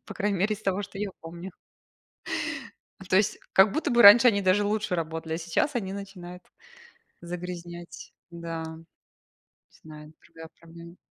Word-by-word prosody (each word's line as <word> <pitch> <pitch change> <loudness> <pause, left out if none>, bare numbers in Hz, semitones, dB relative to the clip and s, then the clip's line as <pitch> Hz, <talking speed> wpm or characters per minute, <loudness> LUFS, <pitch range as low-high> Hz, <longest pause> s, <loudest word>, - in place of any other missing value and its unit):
По - - -8
крайней 205 -2 -1
мере 210 +4 +1
из 215 - -13
того, 195 +1 -1
что 195 0 -9
я 205 -1 -3
помню. 170 +3 -9 1.6
То 185 - +4
есть, 215 +1 +2
как 195 +1 +5
будто 315 - -1
бы 240 0 +5
раньше 235 +5 +10
они 200 -3 +2
даже 190 +2 +3
лучше 210 -2 -1
работали, 160 -1 -3
а - - -3
сейчас 170 - -1
они 195 -5 -3
начинают 185 -3 -9 0.8
загрязнять. 175 0 -8 0.2
Да, 165 -1 -6 0.9
не - - -29
знаю, 155 -1 -12
другая 160 0 -12
проблема. 170 +1 -13
185 Hz, 150 wpm, -27 LUFS, 170-205 Hz, 1.6 s, раньше